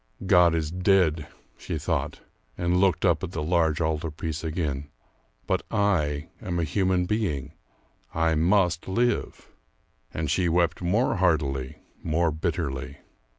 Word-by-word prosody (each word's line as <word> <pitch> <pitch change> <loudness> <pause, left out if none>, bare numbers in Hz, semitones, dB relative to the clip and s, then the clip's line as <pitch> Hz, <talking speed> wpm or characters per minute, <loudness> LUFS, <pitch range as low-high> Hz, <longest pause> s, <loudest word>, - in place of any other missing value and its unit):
"God 90 -3 +5
is 80 -1 -2
dead," 90 -4 +2 0.3
she - - -4
thought, - - -2 0.4
and 90 +1 +1
looked 95 0 +2
up 85 -2 +2
at 95 -1 -5
the 75 - -2
large 80 -1 +1
altar 80 0 -1
piece 80 +1 -5
again. 75 -4 -3 0.6
"But - - 0
I 80 -8 0
am 85 -2 -3
a - - +1
human 90 +1 +1
being; 90 -10 -2 0.6
I 80 0 +1
must 90 +1 +2
live." 120 +6 -1 0.6
And 80 -3 -2
she 90 0 +1
wept 85 0 +1
more 100 +9 +1
heartily, 75 -8 0 0.2
more 80 +1 +1
bitterly.... 75 -4 -3
85 Hz, 135 wpm, -26 LUFS, 75-90 Hz, 0.6 s, God